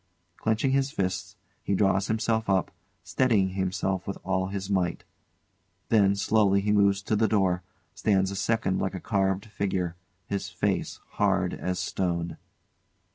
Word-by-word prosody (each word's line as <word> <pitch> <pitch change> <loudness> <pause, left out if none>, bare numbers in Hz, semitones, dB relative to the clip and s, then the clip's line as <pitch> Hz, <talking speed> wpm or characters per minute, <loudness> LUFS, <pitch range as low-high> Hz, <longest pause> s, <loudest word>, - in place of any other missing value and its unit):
[Clenching 110 +4 +1
his 135 0 +2
fists, 95 -8 -3 0.3
he 100 - 0
draws 95 -1 +2
himself 110 0 0
up, 95 -2 +2 0.3
steadying 95 +1 +2
himself 95 0 -2
with 100 - -3
all 95 0 0
his 95 0 -4
might. 95 -4 0 0.9
Then 100 -3 +4
slowly 100 -1 +3
he 105 +1 0
moves 100 -1 +3
to 110 - 0
the 110 +1 +3
door, 95 -4 +2 0.3
stands 95 -2 +1
a - - -4
second 100 -1 0
like 95 - -2
a - - -4
carved 95 +1 0
figure, 95 -5 -2 0.3
his 100 -1 -3
face 95 +3 -1
hard 95 -3 +1
as 90 0 -3
stone. 85 -2 -2
100 Hz, 145 wpm, -27 LUFS, 95-105 Hz, 0.9 s, Then